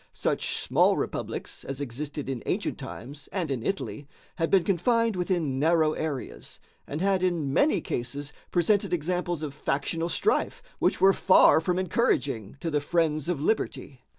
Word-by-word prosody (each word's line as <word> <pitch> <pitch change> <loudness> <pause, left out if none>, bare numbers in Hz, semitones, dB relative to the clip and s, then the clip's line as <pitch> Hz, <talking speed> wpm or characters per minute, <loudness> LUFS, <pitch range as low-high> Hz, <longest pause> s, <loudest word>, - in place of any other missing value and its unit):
Such - - -1
small - - +3
republics - - -4
as 135 0 -5
existed 145 +2 -5
in 130 -4 -3
ancient - - -1
times 140 +5 -9
and 175 -6 -2
in 130 -4 -1
Italy 150 -6 -3 0.3
had 165 - 0
been 190 -3 +4
confined 225 +5 +2
within 170 -7 -1
narrow 160 0 +3
areas, 150 -5 -5 0.3
and 150 +3 -4
had 195 -1 +2
in 170 -7 0
many 290 - +3
cases 140 +4 -4 0.2
presented 190 +2 +2
examples 175 0 -1
of 145 -3 -4
factional 155 +4 -2
strife 430 - 0 0.2
which - - +1
were 195 +1 +7
far 185 -4 +6
from 180 +2 0
encouraging 145 - 0
to 165 - -2
the 150 -1 +1
friends 155 0 0
of 175 -5 0
liberty. 145 - -2
160 Hz, 155 wpm, -27 LUFS, 145-180 Hz, 0.3 s, were